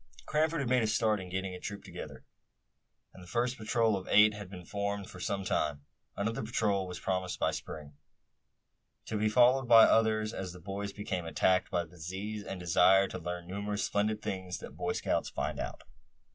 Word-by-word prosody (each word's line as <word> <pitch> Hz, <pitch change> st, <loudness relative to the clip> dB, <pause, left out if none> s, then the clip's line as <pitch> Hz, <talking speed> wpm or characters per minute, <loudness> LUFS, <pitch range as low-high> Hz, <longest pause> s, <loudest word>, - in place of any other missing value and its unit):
Cranford 155 Hz, +1 st, +1 dB
had 130 Hz, -, -2 dB
made 125 Hz, -1 st, +4 dB
a 110 Hz, -, +1 dB
start 110 Hz, -1 st, +2 dB
in 95 Hz, -1 st, -7 dB
getting 95 Hz, 0 st, -3 dB
a 90 Hz, -, -7 dB
troop 100 Hz, +1 st, -6 dB
together, -, -, -9 dB, 0.9 s
and 95 Hz, -, -13 dB
the 90 Hz, -, -12 dB
first 120 Hz, +6 st, 0 dB
patrol 110 Hz, -1 st, +1 dB
of 95 Hz, -1 st, -5 dB
eight 105 Hz, +1 st, +6 dB
had 100 Hz, -2 st, -8 dB
been 90 Hz, -2 st, -9 dB
formed 100 Hz, +1 st, -3 dB
for 90 Hz, -, -11 dB
some 100 Hz, +2 st, -2 dB
time. 75 Hz, -4 st, -1 dB, 0.3 s
Another 115 Hz, +3 st, -1 dB
patrol 105 Hz, -4 st, 0 dB
was 90 Hz, -, -6 dB
promised 95 Hz, -1 st, -2 dB
by -, -, +2 dB
Spring, 75 Hz, -2 st, -7 dB, 1.1 s
to -, -, -4 dB
be 110 Hz, +1 st, +2 dB
followed 125 Hz, +3 st, +5 dB
by 115 Hz, -1 st, +9 dB
others 110 Hz, -1 st, +3 dB
as 90 Hz, -2 st, -5 dB
the 90 Hz, -, -11 dB
boys 100 Hz, +3 st, -5 dB
became 95 Hz, -4 st, -4 dB
attacked 90 Hz, +3 st, +2 dB
by 90 Hz, -2 st, 0 dB
the 85 Hz, -, -15 dB
disease, 95 Hz, +5 st, -5 dB
and 95 Hz, -, -6 dB
a 90 Hz, -, -8 dB
desire 95 Hz, +3 st, +5 dB
to 95 Hz, -, -5 dB
learn 90 Hz, 0 st, -5 dB
the 90 Hz, -, -7 dB
numerous 100 Hz, +1 st, -2 dB
splendid 105 Hz, +1 st, 0 dB
things 95 Hz, -2 st, -4 dB
that -, -, -10 dB
Boy 90 Hz, 0 st, -1 dB
Scouts -, -, -1 dB
find -, -, -3 dB
out. -, -, -5 dB
100 Hz, 200 wpm, -31 LUFS, 90-110 Hz, 1.1 s, by